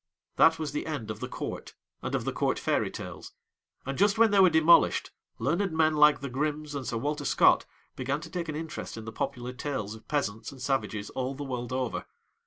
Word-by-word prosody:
That 160 0 +6
was 155 -2 -3
the 150 - -3
end 140 -9 -3
of 110 - -7
the - - -4
Court - - -6 0.3
and - - -2
of - - -2
the - - -1
Court - - 0
Fairy - - 0
Tales, - - -8 0.5
and 135 +3 -4
just 205 +2 +4
when 225 -1 +5
they 200 - +4
were 185 -1 +8
demolished, 160 +1 +5 0.3
learned 175 +7 0
men 155 -1 +4
like 150 -1 +5
the 140 - -3
Grimms 150 +2 -2
and 135 -4 -4
Sir 115 - -1
Walter 145 +5 -2
Scott - - +4 0.3
began 135 +3 -1
to - - -9
take 175 -3 -3
an 155 - -3
interest 160 -6 -6
in 110 - -7
the 115 - -6
popular 125 +1 -4
tales 125 -6 -3
of 110 - -13
peasants 110 -7 -2
and 135 - -12
savages 110 -6 -2
all 130 +1 -3
the 145 - -5
world 125 -3 -4
over. 130 -2 -2
140 Hz, 215 wpm, -28 LUFS, 125-155 Hz, 0.5 s, were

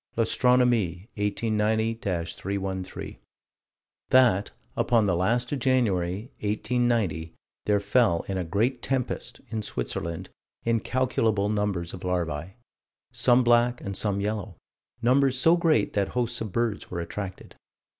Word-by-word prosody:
L'Astronomie, 115 -5 +2
1890 110 +1 0 0.4
313: 95 -1 -4 0.9
That, 120 -6 +4 0.3
upon 115 -3 +3
the 95 -3 +2
last 120 +8 +1
of 145 - -1
January, 105 -5 +1
1890, 105 -7 0 0.3
there 105 -1 +3
fell, 100 -3 +2
in 95 - -2
a 95 - -1
great 110 +9 0
tempest, 130 -2 -2
in 110 -1 -2
Switzerland, 85 -3 -4 0.3
incalculable 115 -3 +1
numbers 105 -5 -1
of 95 - -8
larvae: 90 -1 -2 0.6
some 125 0 +4
black 120 0 +3
and 100 0 -5
some 100 -1 0
yellow; 105 -1 -3 0.5
numbers 130 +2 +3
so 165 +5 +6
great 160 -10 +2
that 100 -2 +1
hosts 120 -1 -2
of 110 -3 -4
birds 115 -1 -1
were 85 - -4
attracted. 95 +3 -6
105 Hz, 120 wpm, -26 LUFS, 95-120 Hz, 0.9 s, so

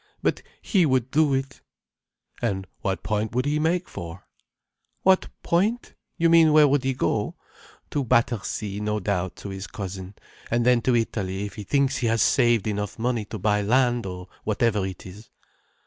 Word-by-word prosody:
But - - +1 0.2
he 195 -5 +3
would 130 -4 +1
do 150 -2 +3
it." 135 0 -4 0.8
"And 95 -5 -1
what 95 -1 -2
point 110 +1 -2
would 125 +1 +1
he 150 +1 +1
make 170 +3 +1
for?" 85 +1 -8 0.8
"What 190 0 +4
point? 210 +8 0 0.2
You 165 -1 +3
mean 165 -1 +6
where 150 -1 +7
would 145 -1 +2
he 135 -1 0
go? 105 -4 -1 0.6
To 145 - 0
Battersea, 110 -4 0
no 105 0 -1
doubt, 95 -2 -2
to 100 - -8
his 95 0 -6
cousin—and 100 +4 -5
then 125 -1 +4
to 125 +1 +2
Italy, 100 -4 -1
if 100 - -7
he 105 - -7
thinks 140 +3 +1
he 120 - 0
has 115 -1 +3
saved 120 -3 +3
enough 105 -1 -3
money 115 -1 -1
to 110 - -6
buy 105 +1 +1
land, 120 +1 +2
or 90 -1 -7 0.2
whatever 105 -3 +1
it 95 -1 -8
is." 100 +4 -11
115 Hz, 170 wpm, -25 LUFS, 100-135 Hz, 0.8 s, where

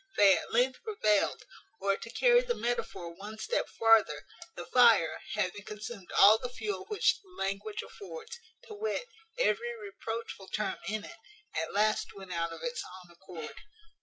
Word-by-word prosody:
They 200 -2 +7
at - - -5
length 250 +3 +2
prevailed; 215 - +1 0.3
or, 195 0 +2
to 230 - -9
carry 485 - +5
the - - -1
metaphor 230 -7 -3
one 205 +5 -9
step 480 - -1
farther, 220 -10 +4 0.3
the - - -6
fire, 225 -10 +5 0.2
having 205 -1 -1
consumed 210 -2 -8
all 215 +2 +8
the 250 - -4
fuel 210 -6 -4
which 420 - +2
the 390 - -26
language 200 - -3
affords, 470 +2 -9 0.2
to 465 -3 -10
wit, 440 +4 -2 0.3
every 475 -1 +1
reproachful 230 - -6
term 210 -2 -2
in 215 0 -2
it, - - -11 0.4
at 160 +1 -2
last 215 +1 +1
went 190 -2 -8
out 170 0 -1
of 165 - -9
its 245 0 -3
own 180 -1 -12
accord. 170 -2 -9
215 Hz, 165 wpm, -31 LUFS, -, 0.4 s, all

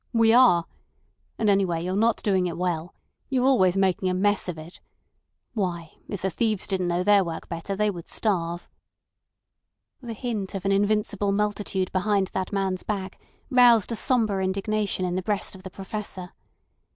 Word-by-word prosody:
We 230 -1 +4
are. 235 -9 +5 0.7
And 220 - 0
anyway, 190 -5 +2
you're 185 +1 -2
not 225 +2 +1
doing 190 -3 +2
it 170 - -5
well. 175 -1 -2 0.3
You're 255 -1 +1
always 195 -9 +4
making 190 -1 +1
a 185 - 0
mess 205 0 +1
of 170 - -4
it. 160 +3 -11 0.7
Why, 175 -7 -3 0.2
if 200 -4 -5
the 190 - 0
thieves 215 +1 0
didn't 185 -2 -1
know 175 +1 0
their 205 0 +5
work 165 -2 -6
better 170 +4 -4
they 210 +1 +1
would 170 -3 -9
starve." 175 -5 -1 1.3
The 235 -2 -6
hint 215 -4 -4
of 195 -1 -5
an 195 - +2
invincible 205 0 +1
multitude 200 -2 -1
behind 195 0 +1
that 190 -1 -2
man's 195 -2 -1
back 195 -2 -5 0.3
roused 245 -4 +5
a - - -1
sombre 215 -5 +1
indignation 195 0 -1
in 180 - -2
the 185 - -1
breast 205 +1 -2
of 190 - -11
the 190 - -8
Professor. 190 -1 -6
195 Hz, 170 wpm, -25 LUFS, 185-210 Hz, 1.3 s, are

